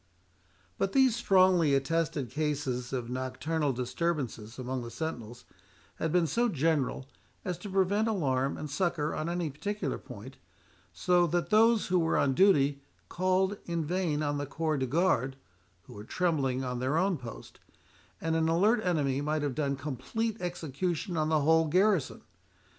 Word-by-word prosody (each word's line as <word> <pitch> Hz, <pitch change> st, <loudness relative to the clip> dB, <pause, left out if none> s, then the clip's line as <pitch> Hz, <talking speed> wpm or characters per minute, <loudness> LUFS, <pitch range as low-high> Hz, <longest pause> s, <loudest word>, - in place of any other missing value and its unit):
But -, -, 0 dB
these 265 Hz, -4 st, +4 dB
strongly 185 Hz, -8 st, +4 dB
attested 145 Hz, -2 st, -1 dB
cases 140 Hz, -4 st, -2 dB
of 125 Hz, -3 st, -3 dB
nocturnal 140 Hz, +4 st, -1 dB
disturbances 125 Hz, -3 st, -3 dB
among 130 Hz, 0 st, -3 dB
the 120 Hz, -, -7 dB
sentinels 120 Hz, -3 st, -6 dB, 0.5 s
had 160 Hz, -, -1 dB
been 175 Hz, 0 st, +3 dB
so 235 Hz, -, +1 dB
general 145 Hz, -, 0 dB, 0.4 s
as 180 Hz, -2 st, -1 dB
to 205 Hz, -, -7 dB
prevent 195 Hz, +3 st, +2 dB
alarm 140 Hz, -10 st, 0 dB
and 155 Hz, -, -5 dB
succour 155 Hz, -1 st, -1 dB
on 155 Hz, +2 st, -3 dB
any 170 Hz, -3 st, -2 dB
particular 205 Hz, +9 st, -3 dB
point, -, -, -11 dB, 0.5 s
so 175 Hz, -1 st, +2 dB
that 175 Hz, +4 st, -1 dB
those 225 Hz, 0 st, +4 dB
who 180 Hz, 0 st, +3 dB
were 165 Hz, -1 st, +1 dB
on 135 Hz, -, +2 dB
duty 140 Hz, -5 st, +4 dB, 0.3 s
called 185 Hz, +2 st, +1 dB
in 170 Hz, -2 st, -2 dB
vain 165 Hz, -3 st, -1 dB
on 145 Hz, -1 st, -1 dB
the 145 Hz, -, -3 dB
corps 155 Hz, 0 st, -1 dB
de 130 Hz, -, -1 dB
garde, 135 Hz, -3 st, +1 dB, 0.5 s
who -, -, -13 dB
were 105 Hz, -, -9 dB
trembling 135 Hz, -3 st, 0 dB
on 125 Hz, -1 st, -3 dB
their 130 Hz, +5 st, 0 dB
own 185 Hz, +2 st, +2 dB
post; 120 Hz, -6 st, -10 dB, 0.6 s
and 165 Hz, 0 st, -1 dB
an 160 Hz, 0 st, +2 dB
alert 210 Hz, +7 st, +3 dB
enemy 145 Hz, -6 st, 0 dB
might 150 Hz, +1 st, -1 dB
have 145 Hz, -2 st, -1 dB
done 140 Hz, 0 st, -1 dB
complete 150 Hz, -, -3 dB
execution 175 Hz, +1 st, -3 dB
on 155 Hz, -1 st, 0 dB
the 155 Hz, -1 st, +2 dB
whole 160 Hz, +2 st, +4 dB
garrison. 185 Hz, -1 st, +1 dB
155 Hz, 160 wpm, -30 LUFS, 135-180 Hz, 0.6 s, these